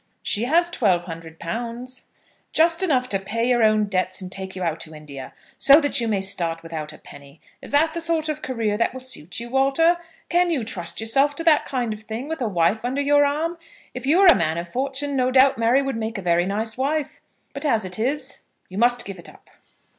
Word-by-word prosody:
"She 215 +3 +2
has 340 +6 +2
twelve 190 - +2
hundred 165 -2 -9
pounds." 240 +6 -6 0.5
"Just 330 +2 +3
enough 265 -9 +1
to 195 - 0
pay 230 +5 -2
your 245 -1 +2
own 215 -1 +4
debts, 185 -2 -1
and 185 -2 -8
take 190 -1 -5
you 185 - -4
out 165 -2 -2
to 160 -1 -7
India, 140 -3 -9 0.3
so 280 +2 +7
that 285 -5 +2
you 230 - -1
may 205 -3 0
start 170 -4 -1
without 160 -2 -6
a 155 - -13
penny. 140 +1 -14 0.2
Is - - -10
that 315 +3 +3
the 335 - -4
sort 330 -1 +1
of 305 0 -3
career 225 -6 -2
that 230 - +1
will 260 - -7
suit 240 -11 -5
you, 235 0 -8
Walter? 275 +6 +3 0.3
Can 350 +1 +2
you 295 -8 0
trust 175 -6 -4
yourself 275 +6 +2
to 330 - -5
that 320 -3 +4
kind 245 -5 -2
of 210 - -9
thing, 225 +5 -6
with 320 -2 -5
a 240 - 0
wife 195 +3 +1
under 255 +3 -2
your 290 +1 +4
arm? 320 +4 -1 0.3
If - - -6
you 310 +5 +4
were 390 - +5
a 350 - +10
man 160 -2 0
of 170 +1 -4
fortune, 275 +6 -2
no 255 -1 +2
doubt 265 0 +4
Mary 240 +4 +3
would 270 -3 -3
make 225 0 -4
a 195 - -6
very 175 0 +2
nice 220 +4 -2
wife; 290 +2 -2 0.3
but, 280 - -5
as 230 -9 +1
it 185 +2 -4
is, 265 +3 -2 0.3
you 190 +2 -6
must 245 +1 +3
give 195 -2 -8
it 170 - -10
up." - - -19
235 Hz, 230 wpm, -23 LUFS, 190-285 Hz, 0.5 s, a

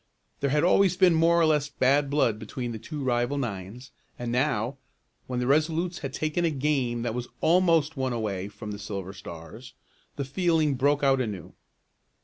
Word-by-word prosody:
There 140 - 0
had 150 +3 +2
always 185 0 +4
been 185 -3 +5
more 165 +1 +4
or 165 - +5
less 150 -2 +2
bad 140 +1 +2
blood 125 -7 +1
between 120 +3 -5
the 110 - -6
two 145 +6 -6
rival 120 +2 0
nines 115 0 -5 0.3
and 120 -1 -4
now, 125 -1 0 0.5
when 125 -1 -2
the 125 - -1
Resolutes 160 +5 +1
had 135 - -5
taken 155 +4 -1
a 170 - +3
game 135 -5 0
that 120 -2 -2
was 125 0 -4
almost 165 -3 +3
won 130 -1 -1
away 105 -5 -2
from 105 +1 -8
the 100 - -6
Silver 100 -2 -5
Stars, 85 +7 -10 0.4
the 140 - -3
feeling 160 0 +1
broke 145 +3 +1
out 135 -1 +4
anew. 105 -8 -5
135 Hz, 180 wpm, -27 LUFS, 115-155 Hz, 0.5 s, been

